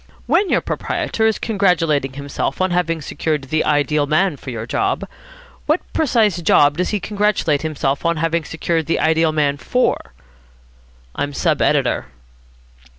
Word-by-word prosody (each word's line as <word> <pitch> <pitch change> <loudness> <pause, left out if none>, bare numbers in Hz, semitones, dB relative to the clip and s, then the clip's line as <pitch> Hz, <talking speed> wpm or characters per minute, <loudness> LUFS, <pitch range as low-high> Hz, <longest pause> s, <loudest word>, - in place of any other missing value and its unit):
When 400 - +2
your - - +2
proprietor 220 0 -1
is 220 - +1
congratulating 165 - +1
himself 140 +1 -4
on 185 0 +1
having 165 -3 0
secured 150 0 -2
the 155 +4 0
ideal 145 0 +1
man 155 +3 +2
for 135 - -9
your 115 -3 -5
job, - - -1 0.6
what 310 +4 +2
precise 220 - +2
job 145 -2 +4
does 180 - 0
he 210 - -1
congratulate 205 -7 0
himself 145 -3 -2
on 170 -1 +1
having 165 +1 0
secured 165 0 -2
the 165 - 0
ideal 160 0 +2
man 145 -2 +1
for?" 145 - -1 1.0
"I'm 145 0 -3
sub - - 0
editor." - - +1
160 Hz, 150 wpm, -19 LUFS, 145-185 Hz, 1.0 s, job